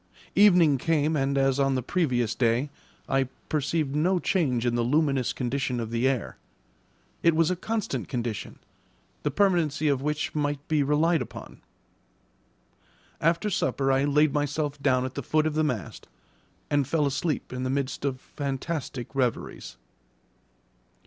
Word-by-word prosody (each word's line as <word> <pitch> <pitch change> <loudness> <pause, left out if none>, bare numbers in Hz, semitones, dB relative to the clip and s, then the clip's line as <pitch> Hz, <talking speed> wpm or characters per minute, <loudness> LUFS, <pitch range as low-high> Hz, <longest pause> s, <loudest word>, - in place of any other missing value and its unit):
Evening 175 -9 +6
came, 155 +1 +1
and, 140 -1 0
as 135 0 +2
on 135 -1 +2
the 130 - -1
previous 125 - 0
day, 120 +4 +1 0.4
I 135 0 +2 0.2
perceived 150 -1 0
no 180 +5 +2
change 140 -10 0
in 120 - +1
the 120 - +1
luminous 135 0 +1
condition 125 0 -2
of 115 -1 -4
the 120 +2 +1
air. 130 -5 -2 0.8
It 170 -1 +4
was 165 +1 +3
a - - +1
constant 185 - -3
condition, 120 -5 -4 0.6
the - - 0
permanency 170 -7 +2
of 135 -2 +1
which 150 +1 -2
might 145 -1 -2
be 155 -2 +2
relied 155 +4 +2
upon. - - -9 1.6
After 170 +6 +1
supper 135 -6 0
I 135 +1 +2
laid 150 0 +3
myself 145 0 -1
down 130 -1 +2
at 130 - -5
the 140 - -4
foot 155 +4 +1
of 155 - 0
the 155 +1 +1
mast, 120 - -3 0.6
and 145 -3 +2
fell 150 0 +1
asleep 140 +1 -2
in 125 - -4
the 130 - -1
midst 135 0 -2
of 135 -2 -1
fantastic 135 -2 -5
reveries. 125 - -2
140 Hz, 150 wpm, -26 LUFS, 130-155 Hz, 1.6 s, Evening